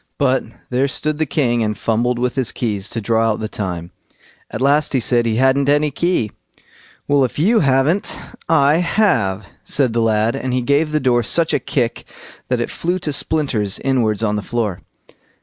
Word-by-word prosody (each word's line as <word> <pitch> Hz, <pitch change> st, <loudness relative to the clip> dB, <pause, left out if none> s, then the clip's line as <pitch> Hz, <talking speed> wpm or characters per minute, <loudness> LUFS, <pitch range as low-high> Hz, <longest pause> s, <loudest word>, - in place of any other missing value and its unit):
But 135 Hz, -2 st, +2 dB, 0.3 s
there 130 Hz, +3 st, +2 dB
stood 150 Hz, +2 st, -2 dB
the 155 Hz, -, 0 dB
king 120 Hz, -5 st, +1 dB
and 105 Hz, -2 st, -1 dB
fumbled 120 Hz, +3 st, 0 dB
with 125 Hz, 0 st, -1 dB
his 130 Hz, -3 st, -1 dB
keys, 105 Hz, -5 st, -3 dB
to 115 Hz, -, -4 dB
draw 115 Hz, +1 st, +1 dB
out -, -, -6 dB
the 110 Hz, -, -3 dB
time. 90 Hz, -5 st, -5 dB, 0.6 s
At -, -, -5 dB
last 145 Hz, +3 st, +2 dB
he 130 Hz, -, +2 dB
said 120 Hz, 0 st, +1 dB
he 110 Hz, -, 0 dB
hadn't 135 Hz, +3 st, +2 dB
any 150 Hz, +1 st, +2 dB
key. 155 Hz, -, 0 dB, 0.8 s
"Well, 145 Hz, -1 st, +3 dB
if 125 Hz, -, -2 dB
you 215 Hz, +9 st, +3 dB
haven't, 140 Hz, +6 st, +1 dB, 0.3 s
I 145 Hz, -1 st, +4 dB
have", 115 Hz, -, +1 dB, 0.2 s
said 130 Hz, -5 st, +1 dB
the 115 Hz, -, +1 dB
lad, 110 Hz, 0 st, +1 dB
as 130 Hz, -, -3 dB
he 125 Hz, -, +1 dB
gave 145 Hz, +4 st, +1 dB
the 155 Hz, -, +1 dB
door 125 Hz, -3 st, +2 dB
such 165 Hz, +8 st, +1 dB
a -, -, +2 dB
kick 125 Hz, -6 st, -2 dB, 0.4 s
that -, -, 0 dB
it -, -, -2 dB
flew 175 Hz, +2 st, -2 dB
to 155 Hz, -5 st, -3 dB
splinters 135 Hz, -10 st, 0 dB
inwards 115 Hz, -5 st, 0 dB
on 105 Hz, -1 st, 0 dB
the -, -, -2 dB
floor. 105 Hz, -4 st, -3 dB
125 Hz, 190 wpm, -18 LUFS, 110-145 Hz, 0.8 s, I